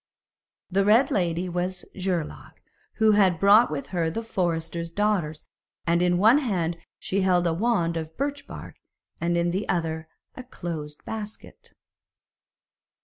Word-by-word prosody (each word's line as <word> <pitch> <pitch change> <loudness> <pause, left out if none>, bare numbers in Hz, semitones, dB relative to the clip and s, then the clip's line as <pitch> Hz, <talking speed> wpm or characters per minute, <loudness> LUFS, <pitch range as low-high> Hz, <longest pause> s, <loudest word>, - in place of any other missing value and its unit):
The 195 +2 +3
red 225 +7 +4
lady 175 -1 0
was 180 +1 -3
Geirlaug, 180 -4 -3 0.4
who 220 -1 +4
had 190 -5 +4
brought 205 +4 +6
with 145 -2 -5
her 170 -3 0
the 225 +8 -4
forester's 170 -4 -2
daughters, 175 -5 -1 0.4
and 170 +1 +2
in 180 0 +3
one 220 +9 +6
hand 175 - -1 0.2
she 195 +1 -1
held 180 -2 +3
a 170 - +2
wand 170 -4 +1
of 160 0 -6
birch 285 +1 -3
bark, - - -9 0.4
and 170 0 0
in 170 0 +1
the 190 +4 -3
other 160 -2 -1 0.3
a - - -8
closed 160 -10 -7
basket. 215 -1 -8
180 Hz, 145 wpm, -25 LUFS, 170-210 Hz, 0.4 s, brought